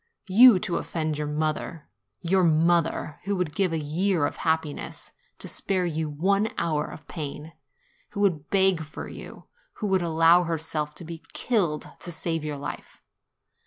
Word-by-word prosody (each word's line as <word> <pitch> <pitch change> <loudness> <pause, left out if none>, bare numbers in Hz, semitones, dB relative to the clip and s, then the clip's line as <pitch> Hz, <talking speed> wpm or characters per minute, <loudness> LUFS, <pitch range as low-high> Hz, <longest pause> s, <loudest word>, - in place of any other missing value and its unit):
You, 230 +2 +9
to 170 - -1
offend 155 -2 -2
your 150 - -2
mother! 155 +1 -2 0.3
your 185 +2 +2
mother, 165 -1 +2
who 200 0 0
would 180 -5 -2
give 185 +1 +1
a 165 - 0
year 160 +2 +1
of - - -3
happi 160 -2 0
ness - - -8 0.3
to - - -9
spare 185 -2 -1
you 160 -2 -2
one 195 +8 +1
hour 155 -3 0
of 155 - -11
pain, 155 0 -6 0.6
who 205 - -2
would 165 -7 +1
beg 190 -3 +3
for 155 - -8
you, - - -10 0.3
who - - -5
would 190 -2 +2
allow 165 +1 +5
herself 155 -2 -2
to 175 - -9
be 165 0 -7
killed 175 - 0
to 175 - -6
save 165 -1 -2
your 150 -1 -3
life! 145 +1 -8
165 Hz, 165 wpm, -26 LUFS, 155-185 Hz, 0.6 s, You